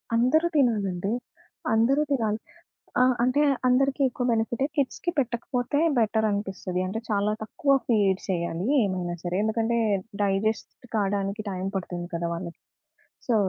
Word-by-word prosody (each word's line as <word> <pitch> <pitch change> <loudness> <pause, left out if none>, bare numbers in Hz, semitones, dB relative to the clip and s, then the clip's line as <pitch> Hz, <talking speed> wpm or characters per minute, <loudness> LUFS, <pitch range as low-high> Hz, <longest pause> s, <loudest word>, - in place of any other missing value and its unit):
అందరూ 255 +8 +3
తినాలండి. 205 -8 +1 0.6
అందరూ 240 +6 +3
తినాలి. 220 -5 +1 0.6
ఆహ్, 255 0 +5
అంటే 255 +4 +3 0.3
అందరికి 270 +2 +2
ఎక్కువ 245 0 -4
బెనిఫిటే. 230 +3 0
కిడ్స్‌కి 285 +5 0
పెట్టకపోతే 245 +2 -1 0.2
బెటర్ 220 0 +2
అనిపిస్తది. 190 -3 -3
అంటే 220 +4 -3
చాలా 205 0 +1
తక్కువ 275 +5 +1
ఫీడ్ 200 -5 +2
చేయాలి 170 0 -1 0.2
ఏమైనా 180 -3 -2
సరే. 180 +1 -2
ఎందుకంటే, 225 +2 +1 0.4
డైజెస్ట్ 205 +2 0 0.2
కావడానికి 200 0 -1
టైం 185 -1 -4
పడుతుంది 175 -2 -4
కదా 170 0 -1
వాళ్ళకి. 170 0 -7 0.7
సో 240 - +3
215 Hz, 125 wpm, -26 LUFS, 190-245 Hz, 0.7 s, ఆహ్